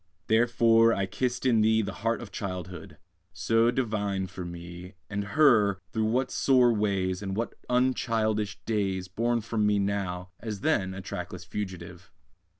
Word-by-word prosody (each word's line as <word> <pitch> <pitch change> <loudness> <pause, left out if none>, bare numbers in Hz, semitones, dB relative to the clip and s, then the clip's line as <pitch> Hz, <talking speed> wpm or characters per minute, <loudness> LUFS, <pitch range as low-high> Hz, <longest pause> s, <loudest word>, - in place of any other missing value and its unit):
Therefore 115 0 +4
I 100 - 0
kissed 120 +6 -2
in 115 -4 +4
thee 110 +1 +3
The 95 -1 -4
heart 115 +2 0
of 105 - -11
Childhood, 90 -4 -6 0.4
so 115 +1 +2
divine 105 -6 -1
for 95 0 -7
me; 85 +2 -9 0.2
And 100 0 -2
her, 110 -10 +5
through 110 -1 0
what 125 +4 0
sore 125 -3 +4
ways, 95 -3 0
And 95 -1 -4
what 115 +2 -2 0.2
unchildish 115 -4 +1
days, 95 -4 -1
Borne 115 +5 0
from 110 -1 0
me 105 0 +3
now, 95 -3 -2
as 105 -3 -6
then, 95 -1 0
a 95 - -6
trackless - - -6
fugitive. 90 -3 -7
105 Hz, 150 wpm, -28 LUFS, 95-115 Hz, 0.4 s, her